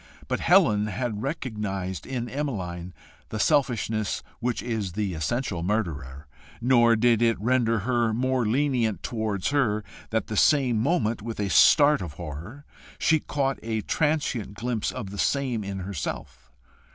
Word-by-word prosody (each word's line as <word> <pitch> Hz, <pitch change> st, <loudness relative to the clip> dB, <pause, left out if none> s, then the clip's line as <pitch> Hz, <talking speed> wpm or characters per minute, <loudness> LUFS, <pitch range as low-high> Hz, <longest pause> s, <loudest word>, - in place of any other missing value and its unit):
But -, -, -1 dB
Helen 105 Hz, 0 st, +4 dB
had 105 Hz, +1 st, -3 dB
recognised 105 Hz, -, -4 dB
in 120 Hz, -2 st, -3 dB
Emmeline 95 Hz, -, -4 dB, 0.4 s
the 110 Hz, -, -4 dB
selfishness 115 Hz, -7 st, +1 dB, 0.2 s
which 120 Hz, 0 st, -2 dB
is 110 Hz, -7 st, -3 dB
the 100 Hz, -1 st, -2 dB
essential 90 Hz, -, -2 dB
murderer, 75 Hz, -8 st, -2 dB, 0.3 s
nor 120 Hz, -1 st, +4 dB
did 115 Hz, 0 st, +3 dB
it 115 Hz, -1 st, +3 dB
render 115 Hz, -1 st, +2 dB
her 120 Hz, 0 st, +1 dB
more 130 Hz, +2 st, 0 dB
lenient 115 Hz, -, +1 dB
towards 110 Hz, -5 st, -2 dB
her 110 Hz, -7 st, +1 dB, 0.3 s
that 110 Hz, -2 st, 0 dB
the 110 Hz, -, -5 dB
same 130 Hz, -2 st, +3 dB
moment, 115 Hz, -, +1 dB
with 115 Hz, 0 st, -6 dB
a 100 Hz, -2 st, -1 dB
start 150 Hz, -, +6 dB
of 85 Hz, -5 st, -6 dB
horror, 85 Hz, -, -8 dB, 0.3 s
she 160 Hz, 0 st, +3 dB
caught 135 Hz, -2 st, -1 dB
a 110 Hz, -1 st, -2 dB
transient 145 Hz, -9 st, -1 dB
glimpse 115 Hz, 0 st, -2 dB
of 110 Hz, -7 st, -6 dB
the 100 Hz, -, -7 dB
same 130 Hz, -6 st, 0 dB
in 100 Hz, -1 st, -5 dB
herself. 90 Hz, -8 st, -6 dB
110 Hz, 145 wpm, -26 LUFS, 100-130 Hz, 0.4 s, start